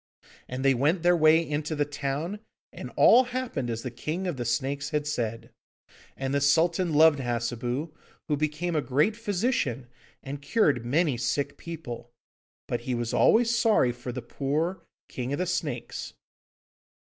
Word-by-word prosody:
And 130 +2 -4
they 135 - +6
went 150 +8 +1
their 175 0 +5
way 160 0 +4
into 150 +1 -2
the 145 -1 +1
town, 145 +7 -3 0.3
and - - -7
all 250 +2 +7
happened 245 - -3
as 115 0 -3
the 125 - -4
King 155 +9 -4
of 175 -4 -2
the 120 -2 -4
Snakes 140 +4 -1
had 150 -1 -1
said. 115 -4 -3 0.7
And 135 0 -2
the 140 - +1
Sultan 170 +5 +3
loved 155 -1 +5
Hassebu, 120 +4 -2 0.3
who 150 - +1
became 155 +3 -2
a 150 - +2
great 150 +11 +1
physician, 200 - -1 0.4
and 140 +1 -6
cured 145 - +2
many 145 +2 +1
sick 140 +4 -1
people. 155 -8 -8 0.6
But - - -2
he 125 - -2
was 120 -1 -3
always 235 +1 +4
sorry 220 - +3
for 120 +1 -7
the 125 -1 -6
poor 155 +9 -2 0.3
King 125 +2 -4
of - - -1
the 180 - 0
Snakes. 180 - -3
145 Hz, 160 wpm, -27 LUFS, 125-170 Hz, 0.7 s, all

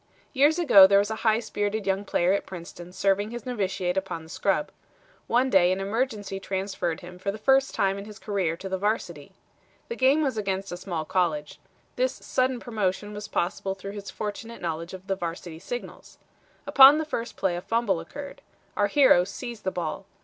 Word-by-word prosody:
"Years 290 +4 +4
ago 225 - +8
there 200 +1 +5
was 205 +2 +2
a 220 - -3
high 220 -1 +3
spirited 210 -2 -2
young 195 +1 0
player 180 -1 +2
at 200 - -2
Princeton 175 -1 -9
serving 200 +2 +1
his 240 -1 -7
novitiate 190 -6 -2
upon 190 -4 -3
the 160 - -15
scrub. 195 - 0 0.6
One 255 +2 +2
day 180 -3 +5
an 185 - 0
emergency 205 -1 -2
transferred 190 -3 -3
him 180 0 -11
for 200 +2 -2
the 205 - -7
first 270 +4 +2
time 195 0 +1
in 200 - -8
his 210 -1 -11
career 195 -7 -2
to 190 - -7
the 190 0 -3
Varsity. 180 -8 -2 0.6
The 470 - -3
game 280 - +3
was 265 -6 -1
against 195 -1 -3
a 175 - -4
small 175 -4 -4
college. 155 -4 -1 0.4
This - - +1
sudden 255 -1 -1
promotion 210 -3 -2
was 210 0 -6
possible 190 +2 -2
through 195 +1 -7
his 200 -1 -8
fortunate 220 +2 -6
knowledge 170 +1 -4
of 190 0 -12
the 195 - -1
varsity 170 -2 -6
signals. 245 +7 -8 0.5
Upon 275 +2 +8
the 315 - -1
first 235 -6 -4
play 190 -3 0
a 175 - -4
fumble 225 -4 0
occurred. 280 - -9 0.3
Our 205 - +2
hero 260 -6 +5
seized 225 +3 -8
the - - +2
ball. 170 -4 -4
200 Hz, 195 wpm, -26 LUFS, 185-230 Hz, 0.6 s, ago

